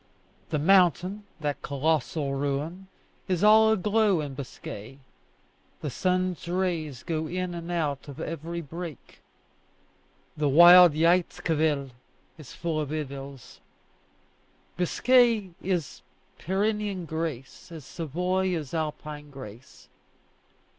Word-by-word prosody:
The 155 - 0
mountain, 185 +4 +3 0.2
that 145 -2 -2
colossal 145 0 -1
ruin, 145 +7 -3 0.4
is 185 0 0
all 220 +1 +7
aglow 210 -2 +2
in 145 -3 -4
Biscay: 130 -3 -8 0.8
the 150 - -3
sun's 185 0 -1
rays 170 -7 -2
go 160 -2 -2
in 180 +1 -3
and 170 0 -7
out 150 -5 -2
of 140 -2 -9
every 165 +2 -5
break. 165 -1 -9 1.1
The 150 -1 0
wild 175 +3 +9
Jaïzquivel 160 -3 +1 0.5
is 145 -5 -11
full 165 -2 -2
of 150 - -4
idylls. 140 -4 -7 1.2
Biscay 225 +2 +3
is 175 -5 -2 0.4
Pyrenean 200 0 -1
grace 160 +1 -5
as 160 -5 -9
Savoy 180 +4 -1
is 150 -5 -6
Alpine 150 -2 -4
grace. 130 -3 -12
165 Hz, 105 wpm, -27 LUFS, 145-185 Hz, 1.2 s, wild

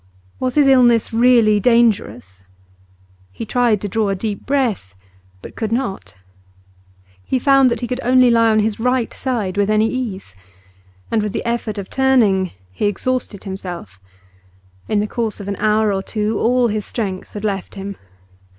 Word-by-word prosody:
Was 255 -1 -2
his 295 -2 +5
illness 245 -4 +4
really 230 -3 +4
dangerous? 155 - +1 0.9
He 225 - -7
tried 235 -1 +1
to 205 - -3
draw 210 +1 0
a 195 - 0
deep 205 +1 -5
breath, 235 - -1 0.5
but - - -10
could 220 -1 -3
not. 235 - -3 1.1
He 260 - -1
found 270 0 +4
that 235 - -3
he 240 - -2
could 250 +1 -3
only 255 0 +4
lie 230 -1 +4
on 215 -1 +3
his 215 0 -2
right 250 0 0
side 220 -8 -3
with 205 0 +1
any 215 +1 +3
ease. 220 - -5 0.8
And 225 - +2
with 210 -1 -3
the - - -4
effort 235 -2 -2
of 195 -1 -5
turning 225 -9 +2 0.2
he 95 - -1
exhausted 230 0 -2
himself; 175 - -7 0.9
in 210 -1 +1
the - - -1
course 220 0 -3
of 200 - -8
an 200 - -2
hour 215 0 +2
or 195 - -1
two 215 +1 -2
all 245 +1 +2
his 210 0 -2
strength 195 -5 -4
had 205 - -7
left 195 -3 -3
him. 200 0 -6
220 Hz, 170 wpm, -19 LUFS, 200-245 Hz, 1.1 s, his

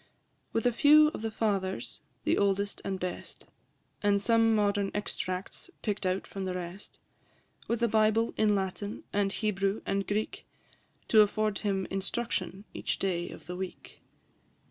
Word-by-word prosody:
With 225 - -1
a 245 - +5
few 300 +4 +7
of 305 - -7
the 225 - -1
Fathers, 190 - -2 0.2
the - - +3
oldest 200 0 +1
and 195 -1 -2
best, 180 0 -5 0.6
And 205 -1 +3
some 225 +1 +4
modern 205 -1 +2
extracts 185 - -4
pick'd 205 -3 -1
out 185 +1 0
from 195 -1 -5
the 185 -1 -2
rest; 180 +2 -7 0.7
With 235 0 0
a - - +5
Bible 220 +1 +3
in 210 -1 +3
Latin, 195 +1 -3
and 200 -1 +2
Hebrew, 195 -1 0
and 195 0 -1
Greek, 210 +1 -2 0.6
To 220 - +8
afford 215 0 +1
him 195 -3 0
instruction 195 -1 -2
each - - -2
day 175 -3 -1
of - - -11
the 180 - -5
week. 185 0 -7
200 Hz, 150 wpm, -30 LUFS, 190-215 Hz, 0.7 s, To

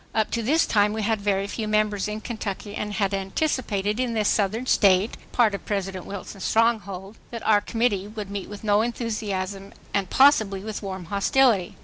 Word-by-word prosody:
Up 220 -1 +1
to 235 - 0
this 300 +9 +3
time 210 -1 +2
we 220 0 -2
had 220 0 0
very 200 -1 +1
few 215 +2 -4
members 215 -2 +1
in 210 +1 -4
Kentucky 210 -3 -5
and 210 0 -4
had 200 -1 0
anticipated 205 0 -1
in 245 -2 -1
this 215 -2 +1
Southern 215 +4 +1
State, 200 -2 +3 0.2
part 230 -4 +3
of 200 - -5
President 195 -3 -3
Wilson 200 0 -7
,'s - - -6
stronghold, 215 -3 0
that 230 -1 -7
our 210 -1 +4
Committee 220 -4 0
would 210 -2 -7
meet 200 -1 -5
with 205 +1 -9
no 210 0 +3
enthusiasm 205 -4 -3 0.2
and 195 -2 0
possibly 220 -8 +4
with 215 +1 -5
warm 190 -3 -6
hostility. 200 +1 +2
210 Hz, 190 wpm, -24 LUFS, 195-225 Hz, 0.2 s, our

